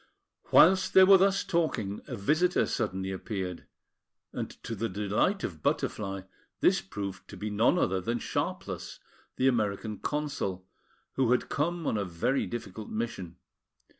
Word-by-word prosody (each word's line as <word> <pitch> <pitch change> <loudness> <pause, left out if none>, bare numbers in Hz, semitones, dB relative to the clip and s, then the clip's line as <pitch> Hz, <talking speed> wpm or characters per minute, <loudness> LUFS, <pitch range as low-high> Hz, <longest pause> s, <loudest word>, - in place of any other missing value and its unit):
Whilst 190 +3 +6
they 190 - +10
were 190 0 +8
thus 195 +1 +3
talking, 120 - -1
a - - -4
visitor 155 - +2
suddenly 95 +1 -2
appeared; 95 -2 -5 0.7
and - - -3
to - - -4
the 115 +1 -2
delight 105 - 0
of 80 -4 -5
Butterfly, 95 +3 -1 0.4
this - - +4
proved 95 0 -6
to - - -10
be 105 0 -4
none 115 +11 +3
other 95 - +1
than 115 +6 -1
Sharpless, - - -4 0.4
the 130 - +2
American 105 -3 0
Consul, 140 -11 -3 0.5
who 130 -3 +3
had 125 - 0
come 170 +3 -1
on 110 - 0
a - - 0
very 95 +9 -1
difficult 110 -3 -6
mission. 110 -6 -4
110 Hz, 145 wpm, -29 LUFS, 95-150 Hz, 0.7 s, they